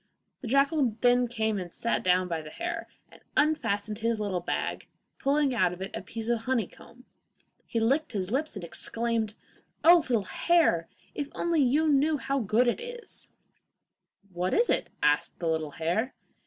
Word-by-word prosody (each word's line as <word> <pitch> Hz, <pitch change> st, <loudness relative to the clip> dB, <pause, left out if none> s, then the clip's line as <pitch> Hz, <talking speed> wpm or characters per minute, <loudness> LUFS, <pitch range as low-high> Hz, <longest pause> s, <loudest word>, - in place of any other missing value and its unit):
The 250 Hz, -, -7 dB
jackal 275 Hz, -2 st, +2 dB
then 245 Hz, 0 st, +4 dB
came 220 Hz, -3 st, -1 dB
and 175 Hz, -2 st, -6 dB
sat 235 Hz, -, -1 dB
down 185 Hz, 0 st, +3 dB
by 170 Hz, -2 st, -2 dB
the 155 Hz, -, -10 dB
little 150 Hz, -, -11 dB
hare, 340 Hz, -1 st, -3 dB, 0.2 s
and -, -, -17 dB, 0.2 s
unfastened 225 Hz, -9 st, +1 dB
his 230 Hz, 0 st, 0 dB
little 200 Hz, -4 st, -1 dB
bag, 175 Hz, -, -3 dB, 0.3 s
pulling 280 Hz, -1 st, +2 dB
out 185 Hz, -6 st, +2 dB
of 180 Hz, -, -10 dB
it 195 Hz, -, -6 dB
a -, -, -4 dB
piece 225 Hz, -1 st, -6 dB
of 235 Hz, -1 st, 0 dB
honeycomb. 250 Hz, 0 st, -3 dB, 0.6 s
He 230 Hz, -, -1 dB
licked 275 Hz, +7 st, +1 dB
his 190 Hz, -2 st, -2 dB
lips 290 Hz, +3 st, -1 dB
and 195 Hz, -, -6 dB
exclaimed, 225 Hz, +4 st, -1 dB, 0.5 s
'Oh, 345 Hz, +2 st, +9 dB
little 245 Hz, -10 st, 0 dB
hare, 245 Hz, -, +2 dB, 0.2 s
if 290 Hz, -, -3 dB
you -, -, -23 dB
only 330 Hz, -5 st, +2 dB
knew 295 Hz, +2 st, +3 dB
how 275 Hz, 0 st, -1 dB
good 230 Hz, +2 st, +2 dB
it 240 Hz, -, 0 dB
is!' 480 Hz, 0 st, -7 dB, 1.1 s
'What 180 Hz, +1 st, 0 dB
is 475 Hz, +1 st, +3 dB
it?' -, -, 0 dB
asked 150 Hz, 0 st, +2 dB
the 170 Hz, -, -3 dB
little 160 Hz, -2 st, 0 dB
hare. 175 Hz, -, -1 dB
235 Hz, 175 wpm, -28 LUFS, 195-280 Hz, 1.1 s, Oh